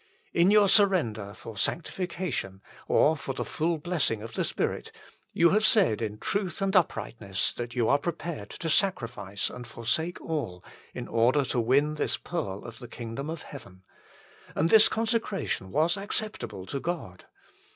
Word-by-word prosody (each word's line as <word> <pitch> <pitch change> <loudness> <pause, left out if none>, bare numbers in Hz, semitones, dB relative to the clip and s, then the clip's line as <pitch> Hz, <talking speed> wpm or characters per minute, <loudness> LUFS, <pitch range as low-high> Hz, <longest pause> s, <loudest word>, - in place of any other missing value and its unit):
In 175 +2 +5
your 205 -1 +6
surrender 175 - +3
for 115 - -9
sanctification, 170 - -2 0.2
or 155 - +4
for 140 -3 -5
the - - -3
full 165 +1 0
blessing 150 -10 -1
of 115 0 -8
the - - 0
Spirit, - - -2 0.4
you 170 - +4
have 215 +2 +3
said 190 - +4
in 105 -2 -3
truth 195 - -2
and 195 0 0
uprightness 110 - 0
that 120 0 -6
you 120 -3 +2
are 140 - +4
prepared 165 - -4
to 165 - -6
sacrifice 115 - 0
and 125 -1 -8
forsake 130 +10 -2
all 120 - -4 0.3
in - - -5
order 125 +5 +3
to 125 - 0
win 140 +6 +3
this 155 - -1
pearl 100 - -4
of 115 -1 -9
the 125 - -9
kingdom 120 +5 -6
of 165 -1 -5
heaven; 95 -9 -12 0.7
and 160 +3 +2
this 220 -1 +8
con 225 +1 0
secration 220 - -1
was 160 - +2
acceptable 200 - -2
to 135 +9 -4
God. 135 - -5
145 Hz, 160 wpm, -28 LUFS, 115-175 Hz, 0.7 s, this